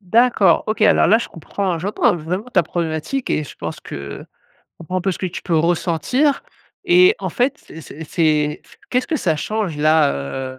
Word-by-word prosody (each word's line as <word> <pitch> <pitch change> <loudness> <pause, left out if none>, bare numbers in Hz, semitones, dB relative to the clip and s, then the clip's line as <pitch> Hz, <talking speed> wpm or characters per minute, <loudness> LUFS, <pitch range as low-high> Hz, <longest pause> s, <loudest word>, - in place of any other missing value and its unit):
D'accord. 210 -2 +3
OK, 215 0 -1
alors - - +5
là 220 - +5
je 235 - -5
comprends 185 +4 -3
hein. 170 - -2
J'entends, 195 +3 +1
vraiment 175 +6 -4
ta - - +4
problématique 170 - -3
et 155 - +1
je - - -11
pense - - -6
que 70 -1 -7
je - - -42 0.3
comprend 170 +2 -5
un - - -4
peu 190 +1 0
ce - - -7
que 185 - -2
tu 180 - -7
peux 170 -3 0
ressentir. 175 - +1 0.5
Et, 365 +4 +6
en - - -3
fait, 250 +2 0
c'est 160 - -12
c 160 +1 -10
c'est 150 -2 +1 0.3
qu'est-ce 250 0 +1
que 320 - 0
ça 165 - 0
change 205 0 -3
là, 155 -1 +3 0.4
heu - - -18
175 Hz, 205 wpm, -19 LUFS, 160-220 Hz, 0.5 s, Et